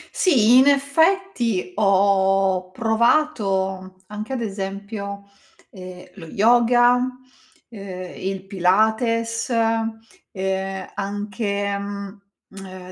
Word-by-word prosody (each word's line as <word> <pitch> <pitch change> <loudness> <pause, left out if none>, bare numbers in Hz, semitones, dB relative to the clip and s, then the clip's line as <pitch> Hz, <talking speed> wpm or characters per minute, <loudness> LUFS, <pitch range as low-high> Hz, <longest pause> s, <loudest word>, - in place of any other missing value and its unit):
Sì, 250 - +4
in 265 - +5
effetti, 280 - +1
ho 195 -2 +2
provato 200 -5 0
anche 210 +5 -7
ad 255 - -3
esempio, 200 0 -5 0.5
ehm, 185 -1 -10
lo 170 -5 -11
yoga, 240 +5 +4 0.7
ehm, 190 -4 -8
il 190 0 -4
pilates, 220 +5 +1
ehm, 220 -5 -3
anche, 200 0 -3
mhmm, 200 -2 -10
200 Hz, 80 wpm, -21 LUFS, 190-230 Hz, 0.7 s, in